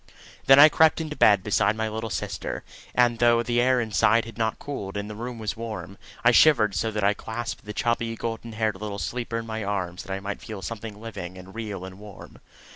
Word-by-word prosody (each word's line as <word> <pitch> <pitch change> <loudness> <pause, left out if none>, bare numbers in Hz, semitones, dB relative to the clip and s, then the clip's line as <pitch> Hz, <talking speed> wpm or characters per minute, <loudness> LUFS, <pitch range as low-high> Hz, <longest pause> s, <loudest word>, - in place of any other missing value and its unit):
Then 135 - +9
I 145 +2 +11
crept 160 +1 +4
into 155 -2 -4
bed 100 -8 +5
beside 105 0 +2
my 110 0 -1
little 110 +1 -4
sister, 95 - -4 0.3
and 120 -2 +3
though 120 -1 +4
the 120 +1 +1
air 130 0 +3
inside 115 0 +2
had 115 -2 -10
not 110 -1 -1
cooled, 100 -9 -6
and 100 0 -4
the 105 - -6
room 120 +2 -6
was 110 -1 -3
warm, 105 -5 -7 0.3
I 120 - +8
shivered 120 -6 +5
so 110 +6 0
that 105 -1 -3
I 100 +1 +4
clasped 115 +1 -6
the 105 - -5
chubby, 115 +1 -1
golden 115 0 -5
haired 110 -3 -1
little 105 -1 -4
sleeper 120 +1 -3
in 115 - -4
my 110 -1 -4
arms 95 -3 -3
that 95 - -9
I 95 - -3
might 100 +1 -5
feel 105 -3 -8
something 110 -1 -6
living 95 -5 -7
and 95 +1 -12
real 105 -5 -5
and 95 +1 -10
warm. 105 -2 -12
110 Hz, 220 wpm, -25 LUFS, 100-115 Hz, 0.3 s, I